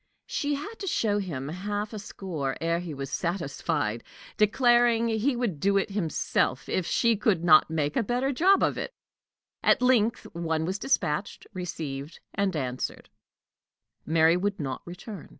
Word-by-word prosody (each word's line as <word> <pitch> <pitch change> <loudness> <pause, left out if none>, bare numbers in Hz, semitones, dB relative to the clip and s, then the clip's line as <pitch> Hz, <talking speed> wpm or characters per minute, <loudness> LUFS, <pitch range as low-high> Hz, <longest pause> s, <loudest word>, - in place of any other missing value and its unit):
She 290 0 -1
had 410 +11 -7
to 390 - -5
show 210 - +1
him 145 -8 -4
half 205 +5 -3
a 215 - -4
score 170 -9 -4
ere 165 +1 0
he 175 -2 -6
was 140 -1 -6
satisfied, 140 - -2 0.3
declaring 235 +1 +4
he 230 +4 +1
would 230 -11 -2
do 200 +5 +3
it 195 +1 0
himself, 160 -7 0
if 185 - -1
she 235 -1 +3
could 195 -5 +1
not 155 -3 +6
make 150 -2 -1
a - - +3
better 245 +5 0
job 375 +9 +4
of - - +1
it. - - -5 0.7
At - - +4
length 235 -2 +3
one 160 -2 -1
was 190 +3 -2
dispatched, 200 - -1
received, 155 -5 -5
and 195 -2 0
answered: 130 -4 -4 0.9
Mary 160 +1 +4
would 200 +2 -1
not 135 -4 -3
return. 180 +2 -9
190 Hz, 155 wpm, -27 LUFS, 160-225 Hz, 0.9 s, not